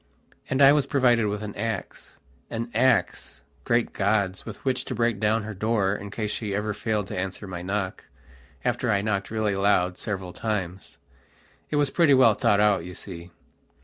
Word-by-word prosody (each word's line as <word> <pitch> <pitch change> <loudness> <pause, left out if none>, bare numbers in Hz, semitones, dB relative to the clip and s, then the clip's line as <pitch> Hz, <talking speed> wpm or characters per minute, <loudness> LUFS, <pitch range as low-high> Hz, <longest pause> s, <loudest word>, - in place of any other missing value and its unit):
And 135 +1 +3
I 135 - +9
was 145 -2 +2
provided 120 -6 +3
with 105 +1 -3
an 105 -1 -5
axean 115 +2 -6
axe!great 120 -1 0
gods, 100 -2 0
with 110 +3 -9
which 130 -1 0
to 125 - -4
break 115 -2 +1
down 110 +1 +1
her 110 0 -6
door 100 -1 +1
in 100 0 -7
case 105 +1 -3
she 105 -2 -3
ever 105 +1 -1
failed 105 -1 -1
to - - -5
answer 95 +2 -4
my 90 -3 -6
knock, 95 +1 -3 0.6
after - - 0
I 100 -1 +1
knocked 100 -2 -1
really 110 -2 0
loud 95 -2 +2
several 95 -4 -4
times. 95 -3 -4 0.7
It - - -2
was 145 -2 +2
pretty 160 -6 +5
well 125 -4 +6
thought 100 0 +2
out, 105 -4 +3
you 90 +1 -8
see. 85 -3 -8
105 Hz, 175 wpm, -25 LUFS, 100-115 Hz, 0.7 s, I